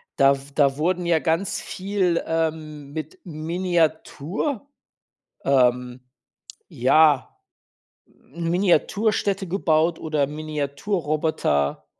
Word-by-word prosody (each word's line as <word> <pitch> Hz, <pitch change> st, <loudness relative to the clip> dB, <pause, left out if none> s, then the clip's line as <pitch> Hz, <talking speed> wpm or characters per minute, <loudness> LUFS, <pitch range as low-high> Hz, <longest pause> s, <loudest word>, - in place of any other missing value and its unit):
da 140 Hz, 0 st, +5 dB
w 135 Hz, -, -10 dB
da 140 Hz, -2 st, +3 dB
wurden 175 Hz, +3 st, 0 dB
ja 170 Hz, -2 st, +3 dB
ganz 165 Hz, +4 st, -1 dB
viel 185 Hz, -3 st, -1 dB
ähm, 155 Hz, -3 st, -3 dB
mit 155 Hz, -1 st, -6 dB
Miniatur 170 Hz, -, -2 dB, 0.8 s
ähm, 125 Hz, -2 st, +2 dB, 0.7 s
ja, 145 Hz, +2 st, +3 dB, 0.7 s
Miniatur-Städte 190 Hz, -, 0 dB
gebaut 165 Hz, -2 st, +1 dB
oder 150 Hz, -3 st, 0 dB
Miniatur-Roboter, 150 Hz, -, -1 dB
160 Hz, 80 wpm, -23 LUFS, 145-175 Hz, 0.8 s, da